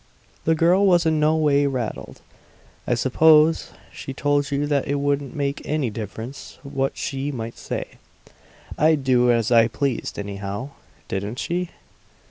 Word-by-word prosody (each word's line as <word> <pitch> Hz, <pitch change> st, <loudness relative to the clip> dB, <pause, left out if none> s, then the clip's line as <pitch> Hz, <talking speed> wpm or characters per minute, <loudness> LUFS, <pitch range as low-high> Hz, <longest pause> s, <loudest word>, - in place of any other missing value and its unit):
The 160 Hz, -, +3 dB
girl 180 Hz, +5 st, +4 dB
was 175 Hz, -2 st, +4 dB
in 160 Hz, -1 st, +2 dB
no 155 Hz, +1 st, +3 dB
way 145 Hz, -2 st, +3 dB
rattled. 125 Hz, -5 st, -4 dB, 0.7 s
"I 120 Hz, -, +2 dB
suppose 155 Hz, +6 st, +4 dB, 0.2 s
she 135 Hz, -, -7 dB
told 145 Hz, -1 st, +1 dB
you 140 Hz, 0 st, 0 dB
that 145 Hz, -2 st, 0 dB
it 140 Hz, -, 0 dB
wouldn't 140 Hz, -1 st, -1 dB
make 140 Hz, -1 st, -2 dB
any 150 Hz, -6 st, -1 dB
difference 110 Hz, +5 st, -8 dB
what 135 Hz, -1 st, -2 dB
she 135 Hz, +1 st, -3 dB
might 115 Hz, -3 st, -6 dB
say; -, -, -4 dB, 0.9 s
I'd 155 Hz, -2 st, +3 dB
do 125 Hz, -2 st, +4 dB
as 115 Hz, -1 st, +1 dB
I 115 Hz, -1 st, +6 dB
pleased 130 Hz, +1 st, -3 dB
anyhow. 100 Hz, +5 st, -5 dB, 0.4 s
Didn't 100 Hz, +5 st, -4 dB
she?" 175 Hz, +4 st, -2 dB
140 Hz, 145 wpm, -23 LUFS, 120-150 Hz, 0.9 s, I